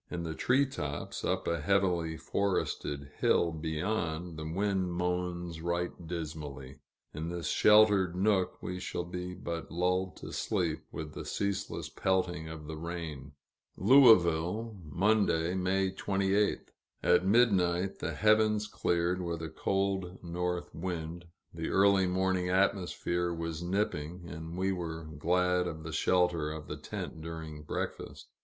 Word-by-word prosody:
In 85 -1 -4
the 80 -1 -3
tree 130 - +3
tops, 75 - -5
up - - -1
a 85 -2 0
heavily 85 -2 +1
forested 75 -8 -2
hill 85 - +3
beyond, 80 +1 -2
the 80 0 -5
wind 95 0 0
moans 90 -1 -2
right 85 +1 -1 0.2
dismally. 75 -5 -6 0.3
In 80 +3 -4
this 85 -1 -3
sheltered 105 -4 +5
nook, 95 -1 +1
we 90 0 -4
shall 90 - -3
be 90 +1 -5
but 85 -2 -5
lulled 90 +2 0
to - - -8
sleep - - -1
with 75 -1 -6
the - - -6
ceaseless 100 -1 -2
pelting 90 -4 -1
of 80 -2 -8
the 80 +1 -6
rain. 80 -4 -6 0.4
Louisville, 105 - +5
Monday, 90 -1 +2
May 95 +1 +1
28th. 100 +1 0 0.3
At - - +4
midnight, 95 -4 +3
the - - -3
heavens 110 0 +3
cleared, 85 +1 0
with 85 -2 -3
a 80 - -4
cold 95 +2 -1
north 90 +1 -3
wind; 85 0 -4 0.3
the 80 -1 -3
early 95 -1 +4
morning 95 0 +1
atmosphere 90 -2 +1
was 85 -1 -4
nipping, 85 -2 -2
and 80 +2 -7
we 95 +1 +1
were 80 -3 -4
glad 90 +4 +1
of 80 -2 -6
the 80 - -6
shelter 90 -4 +2
of 80 -1 -6
the - - -5
tent 80 - -6
during 80 -2 -7
breakfast. 75 - -5
90 Hz, 135 wpm, -31 LUFS, 80-95 Hz, 0.4 s, sheltered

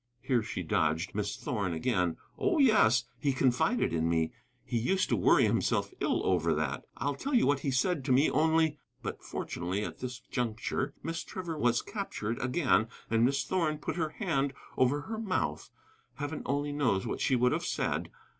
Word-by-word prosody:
(Here 125 -4 +2
she 105 -4 -4
dodged 80 +2 0
Miss 105 0 -2
Thorn 100 -8 -2
again.) 90 -2 0 0.2
"Oh, 390 -4 +1
yes, 210 - +5 0.2
he 140 -2 +1
confided 135 - +2
in 80 0 +1
me. 80 -1 +1 0.3
He 120 - -1
used 185 +11 +1
to 120 - +3
worry 90 - +5
himself - - +1
ill - - 0
over 85 -3 +2
that. 75 -2 -2
I'll 145 +4 -1
tell 270 - -2
you 240 - +5
what 140 +1 +3
he 140 - -2
said 140 +4 +1
to 135 - 0
me 135 +4 +5
only 160 0 +2
" - - -39
But - - -5
fortunately 90 +4 -3
at - - -6
this 125 -1 -5
juncture 120 +2 -2
Miss 165 0 -3
Trevor 180 -4 -5
was 120 -3 +2
captured 120 - -4
again, 130 -4 +2 0.2
and 115 0 +3
Miss 140 +3 +2
Thorn 160 -5 0
put 150 - -4
her 160 -3 0
hand 150 - -1 0.2
over 130 +3 +2
her 220 +8 -5
mouth. 200 -5 -2 0.5
Heaven 145 +2 -4
only 145 +1 0
knows 125 -10 +1
what - - -3
she 130 - +3
would 125 0 +3
have - - 0
said! - - -1
130 Hz, 185 wpm, -30 LUFS, 110-155 Hz, 0.5 s, yes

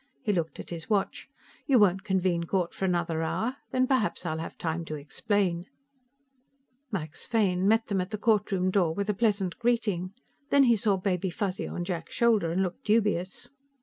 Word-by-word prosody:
He 210 - +1
looked 165 -3 -2
at - - -8
his 165 +2 -7
watch. 200 -3 -1 0.4
"You 270 -3 +5
won't 195 -3 +4
convene 185 -4 +1
court 180 0 -1
for 195 - -2
another 170 -3 0
hour? 225 +11 -1
Then 255 0 +2
perhaps 255 -8 0
I'll 160 -2 -2
have 165 - -6
time 165 0 -2
to 155 - -5
explain." 175 +4 -1 1.3
Max 160 -6 -4
Fane 195 -5 +2
met 225 +2 +4
them 195 -3 0
at 180 - -4
the 210 - -3
courtroom 200 -4 +1
door 175 -5 +2
with 200 +1 0
a - - -2
pleasant 200 -4 0
greeting. 210 -7 0 0.4
Then 280 -1 +5
he 240 -3 +5
saw 205 -2 +2
Baby 185 -1 -1
Fuzzy 190 +1 -3
on 175 - -4
Jack's 175 -2 -4
shoulder 220 -8 +3
and 185 +3 +1
looked 180 -2 -4
dubious. 210 -4 0
190 Hz, 180 wpm, -28 LUFS, 175-210 Hz, 1.3 s, You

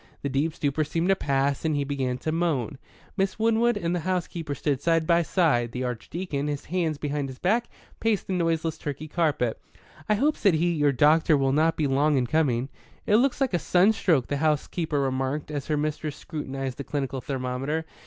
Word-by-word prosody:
The 140 - -1
deep 150 +4 0
stupor 145 +1 0
seemed 165 +4 -1
to 195 - +5
pass, 140 -4 0
and 160 -2 +1
he 145 - 0
began 135 -3 -2
to 155 - +1
moan. 155 -5 -1 0.4
Miss 195 0 0
Winwood 230 +1 +2
and 170 -3 -1
the - - 0
housekeeper 170 -3 -3
stood 155 +4 +1
by 170 +1 +4
his 170 - -2
side. 120 - +2
The 130 - -3
Archdeacon, 140 +5 -3
his 145 -1 -3
hands 165 -3 -1
behind 145 -1 -2
his 130 - -9
back, 220 - +1 0.3
paced 225 -3 0
the 190 - -3
noiseless 165 -2 0
Turkey 145 +1 -5
carpet. 150 -8 0 0.5
"I 210 - +4
hope," 290 +8 +1
said 195 -6 +3
he, 170 +2 +2
"your 145 -3 +2
doctor 150 +3 +4
will 135 -1 +1
not 160 +2 +2
be 155 - +1
long 140 +2 +2
in 125 - +2
coming." 130 -2 +1 0.4
"It 210 - +4
looks 260 +2 +2
like 270 -6 +1
a 175 - +2
sunstroke," 180 - +3
the 145 - -2
housekeeper 155 +1 0
remarked, 135 +2 -1
as 145 -3 -4
her 150 - 0
mistress 150 0 -2
scrutinized 135 -4 -5
the - - -3
clinical 135 -3 -3
thermometer. 135 +4 -3
150 Hz, 195 wpm, -26 LUFS, 140-170 Hz, 0.5 s, to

